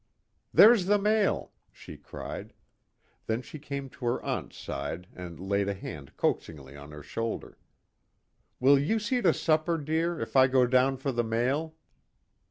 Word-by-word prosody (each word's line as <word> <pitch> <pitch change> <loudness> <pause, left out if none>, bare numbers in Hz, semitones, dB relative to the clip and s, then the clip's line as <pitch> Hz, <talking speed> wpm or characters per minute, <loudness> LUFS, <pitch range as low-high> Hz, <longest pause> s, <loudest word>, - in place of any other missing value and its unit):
"There's 215 -4 +7
the 205 +1 +4
mail," 210 0 +1 0.2
she - - -11
cried. - - -8 0.7
Then 115 +3 -1
she 155 - -10
came 140 -1 -5
to 130 - -9
her 120 - +1
aunt's - - -4
side 75 +6 -5
and 90 -2 -9
laid 100 +1 0
a 100 - -2
hand 75 -7 -9
coaxingly 70 -4 -2
on 70 0 -11
her 75 -1 -10
shoulder. 115 +7 -5 1.0
"Will 135 +2 +6
you 160 +11 +1
see 235 +4 -1
to 180 -6 +5
supper, 160 +1 +1
dear, 160 +2 -1
if - - -6
I 130 -1 +7
go 130 -1 +4
down 130 +2 +3
for 135 +1 -2
the 120 -1 0
mail?" 130 +8 -1
130 Hz, 160 wpm, -28 LUFS, 100-160 Hz, 1.0 s, There's